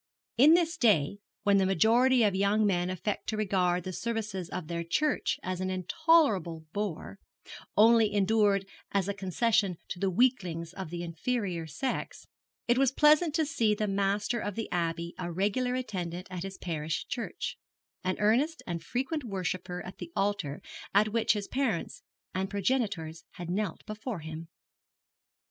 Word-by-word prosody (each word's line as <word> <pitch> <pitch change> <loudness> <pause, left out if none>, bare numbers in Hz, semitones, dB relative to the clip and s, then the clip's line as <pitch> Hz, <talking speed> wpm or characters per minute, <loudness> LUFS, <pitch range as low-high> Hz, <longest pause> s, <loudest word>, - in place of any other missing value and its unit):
In 290 +7 +7
this 340 -1 +1
day, 200 - +3 0.2
when 200 -2 +4
the 195 - +3
majority 235 +5 +4
of 205 -2 +3
young 200 +3 +2
men 180 -3 +1
affect 185 +3 -3
to 220 - -2
regard 180 -4 +1
the 185 - -5
services 210 -5 -3
of 185 -2 -4
their 170 0 -3
church 295 - 0
as 185 0 -3
an 185 - -1
intolerable 185 - +2
bore, 200 -1 -4 0.6
only 225 0 +6
endured 205 -1 +3 0.3
as 200 -2 +1
a 200 - -1
concession 200 0 +1
to 180 - -5
the 195 - +1
weaklings 180 -7 +1
of 190 -4 -6
the 175 +1 -5
inferior 175 0 -2
sex, 205 - -4 0.4
it 240 +1 +3
was 270 -2 +4
pleasant 300 +3 +4
to 320 -2 +2
see 225 -8 +1
the 215 - -1
master 200 +4 0
of 205 -3 -4
the 225 - -4
Abbey 170 0 -1
a 175 -1 -3
regular 210 +8 0
attendant 185 -8 -4
at 180 -1 -4
his 195 +1 -6
parish 160 -3 -3
church, 235 -3 -4 0.4
an 185 0 0
earnest 255 +10 +2
and 170 -2 -4
frequent 270 - -2
worshipper 185 -4 -3
at 185 - -9
the 335 - -7
altar 195 -8 -1 0.3
at 215 +1 +5
which 230 -2 +3
his 205 -2 -4
parents 255 -10 -2 0.3
and 190 +1 -1
progenitors 200 -7 -1
had 175 -1 -6
knelt 205 +2 -2
before 215 -2 -5
him. 160 +1 -7
200 Hz, 160 wpm, -29 LUFS, 180-230 Hz, 0.6 s, In